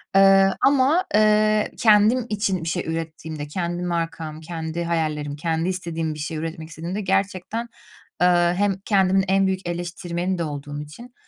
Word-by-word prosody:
Eee, 195 0 +7 0.2
ama, 285 +6 +3
eee, 215 0 +3
kendim 220 +2 +4
için 205 -4 -1
bir 165 - -2
şey 175 +1 -2
ürettiğimde, 160 -2 -5
kendi 175 +2 -3
markam, 165 -3 -3
kendi 165 0 -4
hayallerim, 155 -4 -2
kendi 165 +3 -1
istediğim 165 -3 -3
bir 150 - -9
şey 155 +2 -4
üretmek 160 0 -5
istediğimde 170 +6 -5
gerçekten, 195 +3 -1 0.6
eee, 180 - +6 0.3
hem 200 0 +2
kendimin 190 -2 +3
en 195 +1 +3
büyük 190 -1 -2
eleştirmeni 175 +1 -3
de 170 - -1
olduğum 145 -1 -5
için, 235 +12 -11
175 Hz, 150 wpm, -23 LUFS, 160-195 Hz, 0.6 s, Eee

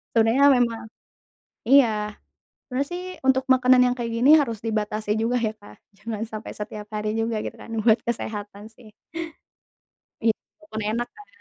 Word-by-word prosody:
Sebenernya 230 +5 +5
memang 230 -2 0 0.8
iya, 220 -6 +4 0.5
sebenernya 275 +2 -2
sih 360 - -4 0.3
untuk 265 0 +3
makanan 255 0 +5
yang 250 - +2
kayak 235 -1 -3
gini 245 +5 +3
harus 230 -6 -3
dibatasi 215 -1 -1
juga 245 +2 +1
ya 220 -2 -1
Kak, 205 -1 -16 0.2
jangan 220 -2 -5
sampai 215 -1 -7
setiap 210 0 -7
hari 210 0 -2
juga 225 0 -1
gitu - - -5
kan - - -11 0.2
buat 220 -1 +5
kesehatan 210 -3 -4
sih. 220 -2 -17 1.3
Iya, 225 -1 +4 0.3
walaupun 220 -9 -7
enak 240 +2 -2
kan. 415 - -14
225 Hz, 155 wpm, -24 LUFS, 215-250 Hz, 1.3 s, Sebenernya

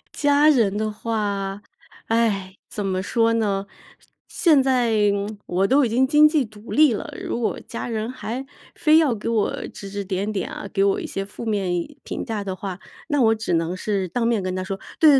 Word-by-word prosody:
家 290 +1 +4
人 225 -9 +3
的 215 0 0
话， 205 -3 -2 0.5
唉， 205 -5 0
怎 205 - -4
么 190 -1 -1
说 230 +2 +2
呢， 200 -3 0 0.6
现 305 -6 +4
在 230 -6 +3 0.3
我 190 +2 +1
都 275 +5 +4
已 245 - +1
经 255 +4 +3
经 300 +2 +6
济 305 -4 +1
独 215 0 -13
立 300 -4 +5
了， 210 - -5
如 - - -3
果 230 - -1
家 235 - -5
人 220 0 -2
还 255 +1 -5 0.3
非 310 0 +5
要 310 -6 +4
给 215 0 -6
我 225 -3 0
指 200 - -9
指 200 0 -4
点 195 +2 -2
点 195 -3 -3
啊， 200 - -7
给 195 - +1
我 195 - +1
一 - - -5
些 195 - -4
负 205 +3 -9
面 205 -4 0 0.4
评 - - -4
价 215 -4 -4
的 190 -1 -3
话， 190 -1 -6 0.3
那 290 -3 +2
我 225 -1 +4
只 220 -5 -2
能 165 +2 0
是 195 0 -1
当 230 +7 -1
面 230 -3 +2
跟 185 0 -3
他 185 - -2
说： 195 +1 -5 0.2
“对 295 -4 +7
215 Hz, 215 characters per minute, -23 LUFS, 195-245 Hz, 0.6 s, 对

